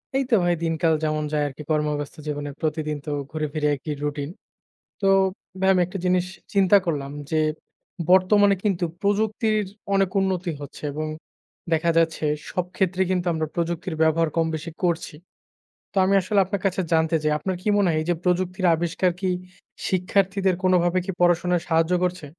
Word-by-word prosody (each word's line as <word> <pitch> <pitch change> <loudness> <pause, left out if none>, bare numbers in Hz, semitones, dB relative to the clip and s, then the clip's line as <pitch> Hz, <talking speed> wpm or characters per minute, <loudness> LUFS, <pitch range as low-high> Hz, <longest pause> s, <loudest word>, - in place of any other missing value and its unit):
এই 270 - +2
তো - - +6
ভাই 175 0 +3
দিনকাল 165 0 +1
যেমন 155 0 0
যায় 150 -1 +1
আরকি, 140 +2 -8
কর্মব্যস্ত 150 -1 -1
জীবনের 145 -1 -4
প্রতিদিন 155 -1 -1
তো 150 - -3 0.2
ঘুরে 155 -1 -2
ফিরে 150 -1 0
একই 150 +2 -5
রুটিন। 145 0 -2 0.7
তো, 195 - 0 0.5
ভাই 190 - +3
আমি 185 - +3
একটা 190 +2 -6
জিনিস 180 0 +2 0.3
চিন্তা 195 0 +5
করলাম 140 -4 -2 0.2
যে, 160 -1 +2 0.7
বর্তমানে 200 +2 +5
কিন্তু 190 -4 +1 0.2
প্রযুক্তির 215 +1 +1 0.3
অনেক 195 -1 +3
উন্নতি 185 -2 -1
হচ্ছে 145 +1 -10
এবং 155 +2 -3 0.7
দেখা 165 +1 +2
যাচ্ছে 165 -1 +1 0.3
সব 180 - -1
ক্ষেত্রেই 190 0 +1
কিন্তু 180 -1 0
আমরা 160 -1 -1
প্রযুক্তির 170 0 -2
ব্যবহার 160 +1 +3
কমবেশি 160 0 -1
করছি। 170 -3 -1 0.8
তো - - -8
আমি 195 - +2
আসলে 200 +2 +1
আপনার 195 +1 -3
কাছে 190 0 +1
জানতে 160 0 +2
চাই 155 0 +1
আপনার 185 +4 -2
কি 195 - -6
মনে 200 - +3
হয় 160 - +1
এই - - -4
যে 175 - +3
প্রযুক্তির 185 +1 0
আবিষ্কার 175 +2 0
কি, 190 -1 0 0.6
শিক্ষার্থীদের 190 0 +1
কোনভাবে 180 -1 +3
কি 195 - -2
পড়াশোনায় 175 0 +3
সাহায্য 165 +1 +2
করছে? 180 -3 -2
175 Hz, 165 wpm, -24 LUFS, 155-190 Hz, 0.8 s, তো